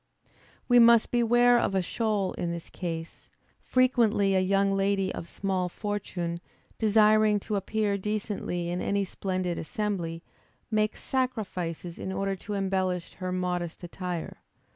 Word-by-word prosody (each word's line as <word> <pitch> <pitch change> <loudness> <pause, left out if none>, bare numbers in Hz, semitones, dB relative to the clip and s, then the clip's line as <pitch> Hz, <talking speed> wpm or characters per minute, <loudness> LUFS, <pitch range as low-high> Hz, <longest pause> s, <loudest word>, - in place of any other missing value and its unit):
We 245 -1 +6
must 235 -1 +6
beware 240 0 +4
of 195 - 0
a 190 - +2
shoal 210 0 -1
in 175 - -3
this 170 -1 -7
case; 165 -2 -6 0.3
frequently 230 -6 +3
a 190 - +4
young 195 +1 +2
lady 195 -1 +1
of 170 - -6
small 190 -2 -2
fortune, 180 -4 -3 0.4
desiring 215 -1 +4
to 210 - -3
appear 200 +1 0
decently 200 -4 -3
in 180 - -2
any 200 0 0
splendid 185 -2 -3
assembly, 175 -5 -3 0.5
makes 215 0 0
sacrifices 185 -10 -3
in 190 - -4
order 195 +1 -1
to 205 +3 -5
embellish 190 -2 -1
her 185 -1 -4
modest 180 -2 -2
attire. 175 -1 -5
195 Hz, 135 wpm, -28 LUFS, 180-215 Hz, 0.5 s, We